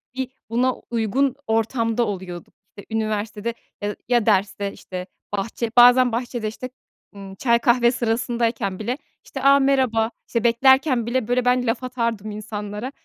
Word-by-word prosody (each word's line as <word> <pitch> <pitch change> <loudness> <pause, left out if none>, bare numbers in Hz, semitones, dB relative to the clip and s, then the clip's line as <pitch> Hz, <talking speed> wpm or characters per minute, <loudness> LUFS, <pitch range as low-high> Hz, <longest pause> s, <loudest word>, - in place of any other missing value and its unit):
bir 260 -1 -3 0.2
buna 250 +2 +2 0.2
uygun 240 +4 0
ortamda 225 +1 +1
oluyorduk. 185 -4 -6 0.2
İşte, 200 - -10
üniversitede, 215 +1 -2 0.3
ya 205 0 -2
ya 240 -3 +2
derste, 200 -1 +1
işte, 180 0 -7 0.3
bahçe, 225 +3 -3
bazen 245 +1 +7
bahçede, 240 -1 -3
işte, 255 +4 -6 0.5
ımm, 195 -1 -9
çay 235 +1 +2
kahve 240 0 +4
sırasındayken 230 -4 -1
bile, 245 +5 -2 0.3
işte, - - -7
a, 275 0 +6
merhaba, 255 -5 +2 0.2
işte, 230 -2 -1
beklerken 260 +1 +4
bile, 240 -1 -1
böyle, 245 0 +1
ben 250 -1 +2
laf 230 +3 -1
atardım 230 -4 -2
insanlara, 210 +3 -6
230 Hz, 145 wpm, -22 LUFS, 215-250 Hz, 0.5 s, bazen